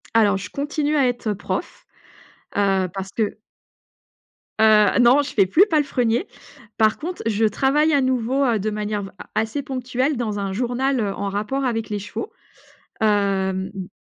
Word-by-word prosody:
Alors, 210 Hz, -3 st, +4 dB
je 200 Hz, +2 st, -7 dB
continue 295 Hz, +3 st, -1 dB
à 270 Hz, -3 st, +4 dB
être, 245 Hz, -2 st, -3 dB
heu, 210 Hz, -, 0 dB
prof, 195 Hz, -, -5 dB, 0.7 s
heu, 195 Hz, -2 st, +2 dB
parce 195 Hz, 0 st, -6 dB
que 215 Hz, -1 st, -2 dB, 1.2 s
Heu, 215 Hz, 0 st, +5 dB
non, 250 Hz, +4 st, +6 dB
je 285 Hz, -, -6 dB
fais 195 Hz, -, +4 dB
plus 315 Hz, -, +5 dB
palefrenier. 260 Hz, -, +1 dB, 0.5 s
Par 215 Hz, -1 st, +3 dB
contre, 350 Hz, +4 st, -5 dB
je 225 Hz, 0 st, +1 dB
travaille 275 Hz, +8 st, +2 dB
à 285 Hz, -, +4 dB
nouveau, 260 Hz, +1 st, +1 dB
heu, 235 Hz, -4 st, +1 dB
de 215 Hz, +3 st, -1 dB
manière 210 Hz, -1 st, -3 dB
v 195 Hz, -, -7 dB
a -, -, -10 dB
assez 225 Hz, +6 st, -1 dB
ponctuelle 255 Hz, +2 st, -2 dB
dans 215 Hz, -4 st, -2 dB
un 195 Hz, -1 st, -3 dB
journal, 250 Hz, +4 st, 0 dB
heu, 205 Hz, -3 st, -1 dB
en 200 Hz, 0 st, -3 dB
rapport 215 Hz, +8 st, -2 dB
avec 225 Hz, -3 st, -2 dB
les 210 Hz, -1 st, -2 dB
chevaux. 205 Hz, -, -6 dB, 0.7 s
Hem, 195 Hz, -2 st, +1 dB
mmh. 190 Hz, -2 st, -6 dB
225 Hz, 170 wpm, -22 LUFS, 205-265 Hz, 1.2 s, non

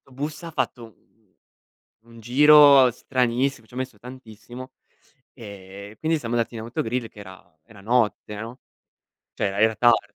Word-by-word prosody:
'sto 135 Hz, -, -23 dB
bus 150 Hz, +5 st, -6 dB
ha 165 Hz, -, -8 dB
fatto 120 Hz, -5 st, -3 dB
u 110 Hz, -, -15 dB, 1.2 s
un 115 Hz, 0 st, -14 dB
giro 140 Hz, +1 st, +6 dB
stranissimo, 125 Hz, 0 st, -2 dB
ci -, -, -25 dB
ha -, -, -12 dB
messo 130 Hz, -4 st, -5 dB
tantissimo 125 Hz, +1 st, -12 dB, 0.6 s
e 100 Hz, -2 st, -12 dB
quindi 160 Hz, 0 st, 0 dB
siamo 120 Hz, -3 st, -5 dB
andati 115 Hz, 0 st, -2 dB
in -, -, -6 dB
autogrill 115 Hz, 0 st, -3 dB
che 105 Hz, -, -15 dB
era 95 Hz, -4 st, -15 dB
era 105 Hz, -3 st, -17 dB
notte, 110 Hz, -1 st, -1 dB
no? 120 Hz, +3 st, -9 dB, 0.7 s
Cioè -, -, -3 dB
era 100 Hz, +1 st, -4 dB
era 110 Hz, +1 st, +3 dB
tardi. 120 Hz, +2 st, +2 dB
120 Hz, 160 wpm, -23 LUFS, 110-130 Hz, 1.2 s, giro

